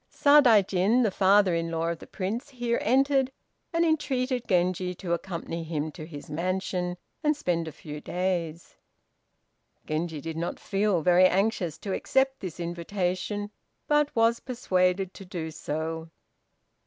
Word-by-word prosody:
Sadaijin, 230 Hz, -6 st, +5 dB
the 215 Hz, -, +2 dB
father 195 Hz, 0 st, +4 dB
in 165 Hz, 0 st, -1 dB
law 165 Hz, 0 st, -1 dB
of 170 Hz, -1 st, -3 dB
the -, -, -12 dB
Prince, 210 Hz, +7 st, -4 dB
here 240 Hz, -3 st, -1 dB
entered, 270 Hz, +2 st, +3 dB, 0.4 s
and 335 Hz, -1 st, +2 dB
entreated 260 Hz, -6 st, 0 dB
Genji 180 Hz, 0 st, +1 dB
to 175 Hz, -1 st, -3 dB
accompany 170 Hz, -1 st, -4 dB
him 155 Hz, -1 st, -3 dB
to 155 Hz, 0 st, -9 dB
his 145 Hz, -4 st, -9 dB
mansion, 180 Hz, +2 st, -2 dB, 0.3 s
and 300 Hz, -1 st, +2 dB
spend 170 Hz, -, -1 dB
a -, -, -5 dB
few 150 Hz, 0 st, -9 dB
days. 175 Hz, -3 st, -3 dB, 1.1 s
Genji 155 Hz, 0 st, -2 dB
did 160 Hz, +2 st, -6 dB
not 170 Hz, +1 st, -3 dB
feel 195 Hz, -4 st, 0 dB
very 180 Hz, +2 st, +6 dB
anxious 185 Hz, -4 st, 0 dB
to 195 Hz, -, -4 dB
accept 270 Hz, +2 st, +1 dB
this 180 Hz, -4 st, -7 dB
invitation, 185 Hz, +4 st, -2 dB, 0.4 s
but 295 Hz, -1 st, +3 dB
was 230 Hz, 0 st, +3 dB
persuaded 190 Hz, -6 st, 0 dB
to -, -, -10 dB
do 170 Hz, -3 st, -5 dB
so. 160 Hz, +1 st, -4 dB
185 Hz, 140 wpm, -27 LUFS, 170-230 Hz, 1.1 s, very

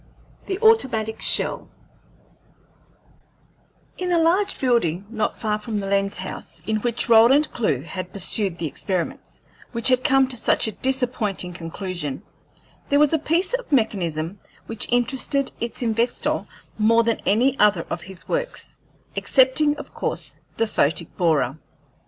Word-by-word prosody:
THE 380 Hz, -, -2 dB
AUTOMATIC 235 Hz, -, +3 dB
SHELL -, -, 0 dB, 2.3 s
In 360 Hz, 0 st, -1 dB
a 345 Hz, -, +3 dB
large 345 Hz, +5 st, +2 dB
building, 200 Hz, -, +1 dB
not 220 Hz, -2 st, -1 dB
far 215 Hz, -2 st, -1 dB
from 210 Hz, 0 st, -3 dB
the 200 Hz, -, -4 dB
lens 195 Hz, 0 st, 0 dB
house 185 Hz, +1 st, -6 dB
in 220 Hz, 0 st, 0 dB
which 235 Hz, +2 st, -1 dB
Roland 240 Hz, +6 st, +6 dB
Clewe 145 Hz, -, 0 dB
had 180 Hz, +2 st, -6 dB
pursued 195 Hz, -1 st, -1 dB
the 170 Hz, -, -3 dB
experiments 180 Hz, +3 st, -4 dB, 0.3 s
which 235 Hz, +1 st, 0 dB
had 255 Hz, 0 st, +3 dB
come 270 Hz, -2 st, +4 dB
to 255 Hz, -, -2 dB
such 225 Hz, -, +2 dB
a -, -, -2 dB
disappointing 240 Hz, -8 st, -1 dB
conclusion, 170 Hz, -2 st, -5 dB, 0.7 s
there 285 Hz, -, +4 dB
was 295 Hz, +1 st, +4 dB
a 320 Hz, -, +3 dB
piece 340 Hz, -, +1 dB
of -, -, -3 dB
mechanism 185 Hz, -, 0 dB, 0.3 s
which 225 Hz, +1 st, -5 dB
interested 260 Hz, +3 st, +1 dB
its 235 Hz, +1 st, -4 dB
inventor 230 Hz, +1 st, 0 dB, 0.3 s
more 230 Hz, +2 st, +4 dB
than 230 Hz, -1 st, 0 dB
any 245 Hz, +6 st, +3 dB
other 205 Hz, -5 st, +4 dB
of 170 Hz, -, -3 dB
his 185 Hz, 0 st, -10 dB
works, -, -, -3 dB, 0.4 s
excepting 285 Hz, +3 st, +3 dB
of -, -, -10 dB
course -, -, -2 dB, 0.2 s
the 225 Hz, -, +2 dB
photic 165 Hz, -5 st, 0 dB
borer. 155 Hz, -5 st, +1 dB
225 Hz, 140 wpm, -23 LUFS, 185-265 Hz, 2.3 s, Roland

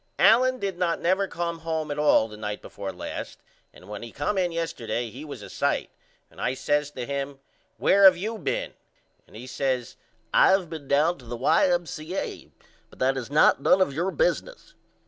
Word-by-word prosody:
Allen 255 Hz, +2 st, +5 dB
did 195 Hz, -6 st, -4 dB
not 170 Hz, -2 st, 0 dB
never 190 Hz, +3 st, +1 dB
come 170 Hz, -2 st, -3 dB
home 160 Hz, -2 st, -3 dB
at 145 Hz, -, -3 dB
all 150 Hz, -7 st, +4 dB
the 105 Hz, -, -11 dB
night 105 Hz, -1 st, -5 dB
before 100 Hz, -1 st, -7 dB
last -, -, -7 dB, 0.3 s
and 90 Hz, -, -17 dB
when 105 Hz, 0 st, -7 dB
he 115 Hz, -, -8 dB
come 145 Hz, +9 st, -2 dB
in 180 Hz, -2 st, +1 dB
yesterday 125 Hz, -8 st, -3 dB
he 135 Hz, +6 st, -9 dB
was 150 Hz, -2 st, -8 dB
a -, -, -8 dB
sight -, -, -1 dB, 0.4 s
and -, -, -12 dB
I 130 Hz, -, 0 dB
says 145 Hz, +2 st, 0 dB
to 130 Hz, -4 st, -6 dB
him 140 Hz, 0 st, -4 dB, 0.4 s
Where 200 Hz, 0 st, +5 dB
have 185 Hz, -2 st, +8 dB
you 220 Hz, +4 st, -4 dB
been? -, -, -2 dB, 0.5 s
And -, -, -18 dB
he 115 Hz, +3 st, -8 dB
says 130 Hz, -1 st, -2 dB, 0.4 s
I -, -, +6 dB
have 190 Hz, -3 st, +2 dB
been 155 Hz, -4 st, -7 dB
down 150 Hz, +5 st, +2 dB
to 125 Hz, -, -15 dB
the 120 Hz, +1 st, -6 dB
Y.M.C.A. 170 Hz, +4 st, 0 dB, 0.4 s
but -, -, -18 dB
that 135 Hz, +1 st, +1 dB
is 130 Hz, -2 st, -5 dB
not 145 Hz, -1 st, +4 dB
none 185 Hz, -, +4 dB
of 185 Hz, -7 st, +2 dB
your 170 Hz, +6 st, -1 dB
business. -, -, -1 dB
155 Hz, 195 wpm, -26 LUFS, 130-180 Hz, 0.5 s, have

